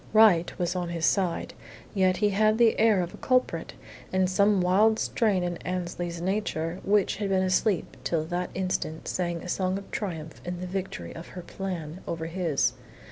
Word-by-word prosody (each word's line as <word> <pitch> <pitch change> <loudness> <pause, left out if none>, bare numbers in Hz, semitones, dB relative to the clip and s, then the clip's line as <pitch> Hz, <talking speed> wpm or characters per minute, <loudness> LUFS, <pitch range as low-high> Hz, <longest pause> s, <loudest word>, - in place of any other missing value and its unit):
Right 210 -6 +6
was 180 0 -1
on 175 -1 -2
his 165 -2 -1
side; 185 +1 +1 0.4
yet 185 -3 +3
he 210 0 +3
had 215 +2 +3
the 230 -2 +4
air 215 -4 +4
of 175 - -6
a - - -10
culprit, 255 -10 0 0.4
and 185 0 +2
some 200 +2 +3
wild 200 +5 +4
strain 210 -7 +1
in 175 -1 -2
Annesley's 175 -1 -4
nature 180 -2 -2
which 205 -1 +2
had 205 -1 -2
been 190 -1 +2
asleep 185 0 +1
till 165 -2 0
that 175 +2 -2
instant 185 -4 -2
sang 175 -2 -2
a - - -7
song 185 +1 0
of 200 - -10
triumph 165 -6 -5
in 175 0 -4
the 185 - -4
victory 180 - -4
of 165 - -9
her 180 - -5
"plan" 175 -3 -5
over 165 -1 -3
his. 165 -4 0
185 Hz, 185 wpm, -27 LUFS, 170-200 Hz, 0.4 s, Right